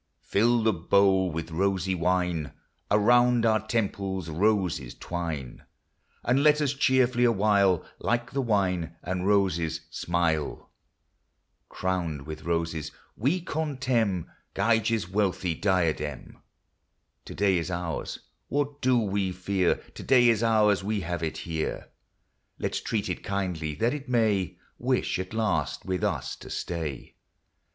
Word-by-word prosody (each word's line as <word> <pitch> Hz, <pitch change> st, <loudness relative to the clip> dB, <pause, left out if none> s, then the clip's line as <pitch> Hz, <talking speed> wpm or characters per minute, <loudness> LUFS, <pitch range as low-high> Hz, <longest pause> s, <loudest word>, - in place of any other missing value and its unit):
Fill 115 Hz, +3 st, +2 dB
the 110 Hz, -1 st, +3 dB
bowl 95 Hz, +2 st, +3 dB
with 80 Hz, 0 st, -5 dB
rosy 95 Hz, +2 st, 0 dB
wine! 90 Hz, -4 st, 0 dB, 0.4 s
Around 120 Hz, +3 st, +4 dB
our 110 Hz, -1 st, +4 dB
temples 100 Hz, -5 st, -2 dB
roses 90 Hz, -, 0 dB
twine! 80 Hz, -7 st, -5 dB, 0.6 s
And 125 Hz, +3 st, +2 dB
let 150 Hz, 0 st, +5 dB
us 145 Hz, -2 st, +1 dB
cheerfully 130 Hz, -3 st, +3 dB
awhile, 100 Hz, -6 st, +3 dB
Like 120 Hz, 0 st, -1 dB
the 140 Hz, -, 0 dB
wine 90 Hz, -, 0 dB
and 90 Hz, +2 st, -2 dB
roses, 85 Hz, -5 st, +1 dB
smile. 85 Hz, -3 st, -1 dB, 1.0 s
Crowned 85 Hz, -6 st, -2 dB
with 80 Hz, 0 st, -8 dB
roses, 80 Hz, -2 st, -1 dB, 0.2 s
we 145 Hz, -, +1 dB
contemn 130 Hz, -, -1 dB, 0.3 s
Gyges 115 Hz, -2 st, +2 dB
5 90 Hz, -, -15 dB
wealthy 95 Hz, -4 st, +1 dB
diadem. 80 Hz, -6 st, -1 dB, 0.9 s
To -, -, -8 dB
day 95 Hz, -3 st, +3 dB
is 85 Hz, +1 st, -4 dB
ours, 85 Hz, -2 st, -3 dB, 0.3 s
what 145 Hz, 0 st, -2 dB
do 130 Hz, -1 st, +3 dB
we 100 Hz, -4 st, 0 dB
fear? 90 Hz, 0 st, +1 dB
To -, -, -13 dB
day 125 Hz, -3 st, +5 dB
is 115 Hz, -2 st, +2 dB
ours; 105 Hz, -4 st, +3 dB
we 105 Hz, 0 st, -1 dB
have 85 Hz, -1 st, -3 dB
it 80 Hz, -1 st, -2 dB
here: 80 Hz, -2 st, -3 dB, 0.7 s
Let -, -, -3 dB
's -, -, -2 dB
treat 110 Hz, -3 st, -2 dB
it -, -, -4 dB
kindly, 90 Hz, -7 st, -2 dB
that 115 Hz, -, +1 dB
it 145 Hz, -3 st, -6 dB
may 110 Hz, -7 st, +1 dB, 0.2 s
Wish, 125 Hz, -6 st, 0 dB
at 95 Hz, 0 st, -5 dB
least, 110 Hz, -2 st, -1 dB
with 95 Hz, -2 st, -2 dB
us -, -, -1 dB
to -, -, -11 dB
stay. 80 Hz, -6 st, -5 dB
95 Hz, 135 wpm, -27 LUFS, 85-115 Hz, 1.0 s, let